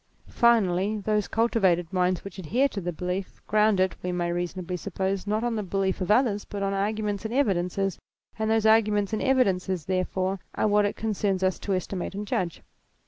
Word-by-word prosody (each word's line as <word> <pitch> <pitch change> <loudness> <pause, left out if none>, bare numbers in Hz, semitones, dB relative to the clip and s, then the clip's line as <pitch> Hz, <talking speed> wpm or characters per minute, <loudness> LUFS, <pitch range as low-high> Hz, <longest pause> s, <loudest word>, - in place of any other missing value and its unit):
Finally, 215 -4 +3
those 210 0 0
cultivated 190 -7 +1
minds 180 -1 +1
which 195 -1 -9
ad 175 - -7
here 260 - +3
to 210 -7 -5
the 175 0 -2
belief 180 +3 -4
ground 215 -1 +3
it, 185 0 +2
we 180 - -2
may 175 -1 -1
reasonably 175 +1 -3
sup 180 +1 -7
pose, 190 0 -1
not 215 +2 0
on 240 -1 0
the 215 - -1
belief 195 -1 -1
of 185 - -2
others, 210 -2 +3
but 200 -1 -5
on 195 0 0
arguments 205 0 -1
and 225 +2 -3
evidences; 195 -6 0 0.4
and 220 0 0
those 220 -1 +2
arguments 210 -2 +3
and 215 - 0
evidences, 190 - +1
therefore, 185 +1 -1 0.2
are - - +1
what 210 0 +3
it 205 - -1
concerns 200 -3 -1
us 185 -1 +1
to 195 - -1
estimate 185 +1 -4
and 205 +1 -4
judge. 180 -4 -2
195 Hz, 195 wpm, -26 LUFS, 185-215 Hz, 0.4 s, Finally